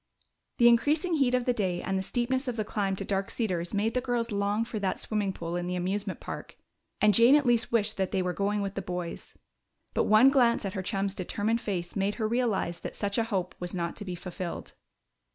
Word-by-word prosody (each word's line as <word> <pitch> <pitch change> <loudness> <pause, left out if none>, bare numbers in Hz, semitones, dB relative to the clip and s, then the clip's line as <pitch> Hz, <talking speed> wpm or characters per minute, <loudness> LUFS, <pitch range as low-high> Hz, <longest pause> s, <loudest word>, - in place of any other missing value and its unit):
The 240 - +6
increasing 300 +9 +3
heat 255 -3 +3
of 250 -1 0
the 250 - +2
day 185 -6 -1
and 190 +2 -2
the 190 - +1
steepness 255 +6 -1
of 250 - -1
the 215 -2 -2
climb 200 -2 -1
to 195 - -5
Dark 195 0 -1
Cedars 180 -7 -2
made 215 +2 0
the 250 - +1
girls 245 -3 -1
long 205 +2 0
for 230 -2 -4
that 195 -2 -1
swimming 210 -3 -1
pool 170 -2 -5
in 175 0 -2
the 180 - -2
amusement 190 +2 -2
park, - - -8 0.4
and 210 0 +5
Jane 235 +7 +7
at 295 -2 +3
least 240 -1 +3
wished 220 -2 +1
that 190 -1 0
they 190 - 0
were 180 0 -1
going 205 +1 0
with 195 -1 -3
the 195 - -3
boys. 180 -2 -6 0.6
But - - +1
one 220 +6 +6
glance 240 -5 +3
at 190 - -3
her 190 - -2
chum's 195 0 -1
determined 210 +4 -1
face 175 -4 -3
made 200 +1 0
her 220 -2 -1
realize 220 -7 0
that - - -7
such 200 +1 -1
a 225 - +1
hope 185 -5 -2
was 180 +1 -4
not 170 -1 -2
to 205 - -5
be 180 -2 -4
fulfilled. 175 0 -6
205 Hz, 230 wpm, -28 LUFS, 185-235 Hz, 0.6 s, Jane